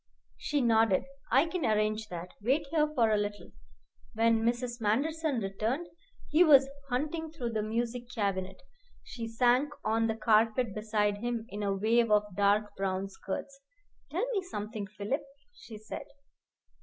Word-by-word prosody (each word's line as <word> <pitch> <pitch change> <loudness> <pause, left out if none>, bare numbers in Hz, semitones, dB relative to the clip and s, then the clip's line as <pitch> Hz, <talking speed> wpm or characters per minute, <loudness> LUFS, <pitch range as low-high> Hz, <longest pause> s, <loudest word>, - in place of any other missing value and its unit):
She 290 -1 0
nodded. 225 -5 +3 0.2
"I 270 +6 +5
can 340 -1 -3
arrange 215 -1 +1
that. 180 -1 -7
Wait 270 +8 +1
here 305 -2 +3
for 230 -3 +3
a 215 - +3
little." 205 0 -4 0.6
When 225 0 +3
Mrs. 240 0 -1
Manderson 290 +7 0
returned, 220 - -2 0.4
he 320 +4 +6
was 275 -5 +7 0.2
hunting 305 +5 -2
through 250 -7 -4
the 220 -1 -1
music 235 +2 -2
cabinet. 195 -5 -2 0.4
She 230 -2 -6
sank 245 +5 +2
on 225 +1 +2
the 220 - -1
carpet 220 +1 +2
beside 210 -1 0
him 235 0 -2
in 205 -2 -5
a 200 -1 0
wave 230 +3 +2
of 210 -2 +2
dark 205 +1 +2
brown 195 0 -2
skirts. 195 +8 -6 0.5
"Tell - - -1
me 405 -5 0
something, 215 - -5
Philip," 210 +8 -3 0.3
she 225 - -11
said. 215 0 -8
225 Hz, 150 wpm, -30 LUFS, 210-255 Hz, 0.6 s, was